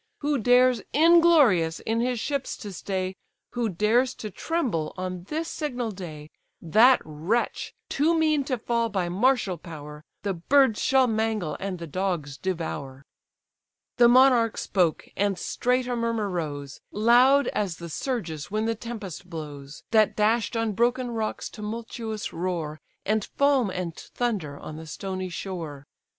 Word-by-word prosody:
Who 290 -2 +1
dares, 245 +2 +4
inglorious, 300 - +5
in 225 +1 -1
his 245 0 0
ships 280 +2 -2
to 205 -3 -8
stay, 185 0 -3 0.4
Who 240 -2 -1
dares 225 +7 +2
to 215 - -7
tremble 235 - -2
on 185 -1 -5
this 320 +8 -3
signal 250 -9 -3
day; 155 -6 -9 0.3
That 225 +10 +5
wretch, 160 +10 -2
too 320 +4 +2
mean 310 -3 +2
to 260 -2 -1
fall 230 0 0
by 190 -4 -1
martial 205 - +1
power, 150 -3 -9 0.2
The 200 -1 0
birds 240 +6 +3
shall 265 -1 +4
mangle, 220 -8 -1
and 195 -1 -3
the 170 - -6
dogs 165 -3 -2
devour." 145 -7 -4 0.9
The 240 -1 +7
monarch 245 -2 +5
spoke; 175 -5 0
and 200 -2 +1
straight 250 +7 0
a 245 0 -2
murmur 230 -3 -1
rose, 145 -5 -4
Loud 245 +6 +5
as 190 -6 -2
the 170 - -7
surges 170 - -4
when 215 +2 -1
the 230 - +1
tempest 215 -6 -7
blows, 145 -4 -8
That 215 -2 +4
dash'd 225 +2 +1
on 225 -1 0
broken 240 +4 +1
rocks 220 -2 -3
tumultuous 220 0 -5
roar, 165 -3 -3 0.2
And 215 0 +1
foam 280 -5 +2
and 180 -3 -4
thunder 200 -13 -3
on 155 - -8
the 160 0 -9
stony 185 +3 -4
shore. 165 -6 -6
210 Hz, 145 wpm, -26 LUFS, 175-245 Hz, 0.9 s, The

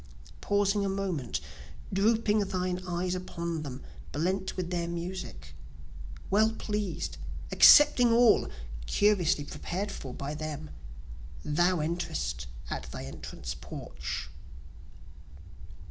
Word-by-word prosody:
pausing 205 0 +2
a 195 - 0
moment, 190 -10 -2 0.5
drooping 215 +2 +3
thine 185 -2 -1
eyes 180 +1 -1
upon 170 -3 -3
them, 135 -3 -7 0.3
blent 185 +6 -1
with 180 -1 -3
their 170 -1 -1
music, 170 - -5 0.8
Well 220 +2 +4
pleased, 210 -5 -3 0.3
accepting 245 -5 +8
all, 235 -1 +5 0.4
curiously 180 - +3
prepared 190 +7 -4
for 135 - -7
by 140 +3 -4
them, 155 0 -5 0.7
Thou 175 +3 +2
enterest 170 +3 -2 0.2
at - - -5
thy - - -6
entrance - - -6
porch. - - -6
180 Hz, 100 wpm, -30 LUFS, 155-200 Hz, 0.8 s, accepting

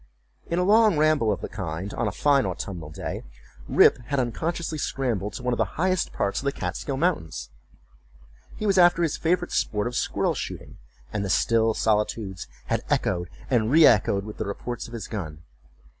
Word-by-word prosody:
In 170 - 0
a 180 - +2
long 215 -2 +5
ramble 150 -7 +3
of 100 - -2
the - - -4
kind 95 0 -5
on 115 - -1
a - - -1
fine 140 +8 +3
autumnal 85 -7 -5
day, 75 - -5 0.5
Rip - - +5
had 140 0 0
unconsciously 155 +6 -2
scrambled 115 -8 -2
to 125 - -7
one 125 0 0
of - - -3
the - - -1
highest 185 +2 +1
parts 100 - -1
of - - -8
the 140 - +2
Kaatskill 135 0 -4
mountains. 80 - -1 1.1
He 215 - -4
was 195 -2 +3
after 175 -1 +5
his 160 - 0
favorite 175 +2 0
sport 105 -1 0
of 120 - -3
squirrel - - 0
shooting, - - -7 0.3
and 105 -2 -1
the 100 - -3
still 115 +2 +2
solitudes 105 -3 -1 0.2
had - - -1
echoed 90 -1 0 0.2
and 115 -4 +2
re 160 +4 +7
echoed 100 -2 +4
with 105 - -8
the - - -3
reports 120 +4 -5
of 120 - -13
his 115 - -5
gun. 80 -8 -6
115 Hz, 190 wpm, -25 LUFS, 100-155 Hz, 1.1 s, re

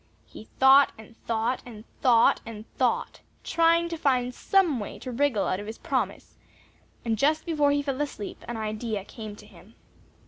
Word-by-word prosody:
He - - -12
thought 270 +1 +7
and 220 +1 -14
thought 230 +2 0
and 220 -3 -11 0.2
thought 235 -3 +4
and 220 -2 -9
thought, - - 0 0.2
trying 335 0 +3
to 335 - -4
find 250 -4 +1
some 350 -4 +2
way 205 - -6
to 255 - -7
wriggle 250 -4 +1
out 185 - -1
of 205 - -7
his 220 - -7
promise, - - -3 0.7
and 225 -2 -1
just 310 +4 +2
before 300 -4 +2
he 285 0 +1
fell 275 0 -2
asleep, 275 -8 -5
an 240 - -4
idea 215 -1 -3
came 215 -2 -8
to - - -15
him. - - -18
245 Hz, 175 wpm, -26 LUFS, 220-285 Hz, 0.7 s, thought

